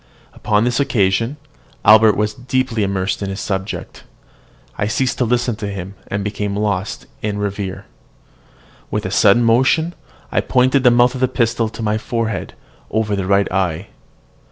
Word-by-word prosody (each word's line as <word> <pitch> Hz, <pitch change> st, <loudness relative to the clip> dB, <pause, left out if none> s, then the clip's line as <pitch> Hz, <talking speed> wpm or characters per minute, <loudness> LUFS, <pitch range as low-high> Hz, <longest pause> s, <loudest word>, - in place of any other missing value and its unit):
Upon 105 Hz, 0 st, +1 dB
this 120 Hz, +2 st, 0 dB
occasion, 115 Hz, -1 st, +1 dB, 0.5 s
Albert 110 Hz, 0 st, +7 dB
was 105 Hz, 0 st, 0 dB
deeply 125 Hz, -1 st, -1 dB
immersed 100 Hz, 0 st, -1 dB
in 100 Hz, -, -2 dB
his 95 Hz, +1 st, -5 dB
subject: 95 Hz, 0 st, -4 dB, 0.7 s
I 105 Hz, -, -1 dB
ceased 125 Hz, +3 st, -1 dB
to 125 Hz, -, +2 dB
listen 120 Hz, 0 st, 0 dB
to 105 Hz, -, -4 dB
him, 95 Hz, -1 st, -6 dB
and 100 Hz, 0 st, -3 dB
became 105 Hz, 0 st, -3 dB
lost 100 Hz, -3 st, -2 dB, 0.2 s
in 105 Hz, -1 st, -2 dB
reverie. 100 Hz, -2 st, -4 dB, 1.1 s
With -, -, -2 dB
a -, -, -3 dB
sudden 105 Hz, +4 st, +4 dB
motion, 130 Hz, +9 st, +3 dB, 0.4 s
I -, -, +2 dB
pointed 130 Hz, +1 st, +2 dB
the 125 Hz, -, +7 dB
mouth 120 Hz, +1 st, +4 dB
of 130 Hz, -, -6 dB
the 130 Hz, -, +4 dB
pistol 115 Hz, -3 st, 0 dB
to 110 Hz, +1 st, -7 dB
my 105 Hz, 0 st, 0 dB
forehead, 115 Hz, -2 st, -3 dB, 0.3 s
over 110 Hz, -1 st, 0 dB
the 95 Hz, -2 st, -3 dB
right 100 Hz, 0 st, +2 dB
eye. 90 Hz, 0 st, -1 dB
110 Hz, 160 wpm, -18 LUFS, 100-120 Hz, 1.1 s, Albert